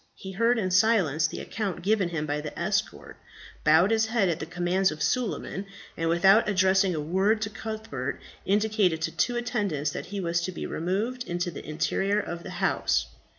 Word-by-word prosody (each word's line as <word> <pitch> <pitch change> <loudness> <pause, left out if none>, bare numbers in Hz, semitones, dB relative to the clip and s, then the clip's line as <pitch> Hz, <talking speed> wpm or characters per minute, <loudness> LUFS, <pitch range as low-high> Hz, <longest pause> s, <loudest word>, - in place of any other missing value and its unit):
He 190 - -8
heard 230 +5 +2
in 185 -4 -1
silence 185 -6 +3
the - - -6
account 195 -5 -4
given 200 -2 +2
him 160 -3 -2
by 150 0 -2
the 150 - -7
escort, - - -2 0.5
bowed 160 +6 +5
his 220 0 +2
head 220 -4 +2
at 165 - -1
the 155 - -5
commands 175 +2 +1
of 155 0 -4
Suleiman, 215 -5 -2 0.3
and, 165 0 -1
without 195 +6 +5
addressing 190 -1 +3
a - - -2
word 190 +8 +1
to 210 - -4
Cuthbert, 215 - -5 0.2
indicated 205 -4 +2
to 165 - -1
two 245 - +1
attendants 200 - -1
that - - -6
he 200 0 -5
was 170 -2 0
to 185 - -3
be - - -6
removed 215 +9 -2
into 175 -1 -2
the 150 - -8
interior 195 +6 0
of 170 -4 -5
the - - -8
house. 65 - +1
190 Hz, 190 wpm, -27 LUFS, 165-215 Hz, 0.5 s, bowed